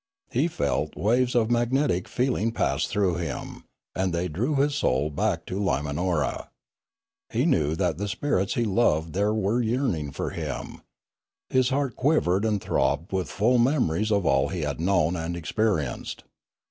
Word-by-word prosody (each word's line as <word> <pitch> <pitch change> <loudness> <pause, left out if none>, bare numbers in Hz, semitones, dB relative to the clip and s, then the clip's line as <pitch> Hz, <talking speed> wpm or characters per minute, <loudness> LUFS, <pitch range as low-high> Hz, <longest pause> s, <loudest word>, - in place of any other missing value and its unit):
He 135 +7 +2
felt 75 - -1
waves 120 +9 +1
of 115 -1 +2
magnetic 120 -5 +1
feeling 120 -3 0
pass - - 0
through 95 -4 +1
him, 85 -4 -5 0.3
and 95 0 0
they 85 +2 -1
drew 115 - -1
his 140 +1 +2
soul 75 - +1
back 85 +1 -1
to 95 - -4
Limanora. 75 -2 -1 0.8
He 120 +5 +1
knew 80 - +2
that 90 -3 -1
the 105 - -2
spirits 100 -3 0
he 120 - +1
loved 85 -7 +1
there 100 +2 +1
were 110 +2 +1
yearning 110 - 0
for - - -4
him. - - -5 0.7
For - - -7
his 130 -1 +4
heart 135 -3 -1
quivered 110 - +2
and 105 -2 +1
throbbed 70 0 0
with 95 -2 -1
full 120 +4 +2
memories 110 - +2
of 100 -3 +2
all 70 -2 +3
he 90 -3 -4
had 75 +1 -3
known 90 -2 +2
and 85 +1 -3
experienced. 85 - -2
100 Hz, 160 wpm, -26 LUFS, 80-120 Hz, 0.8 s, his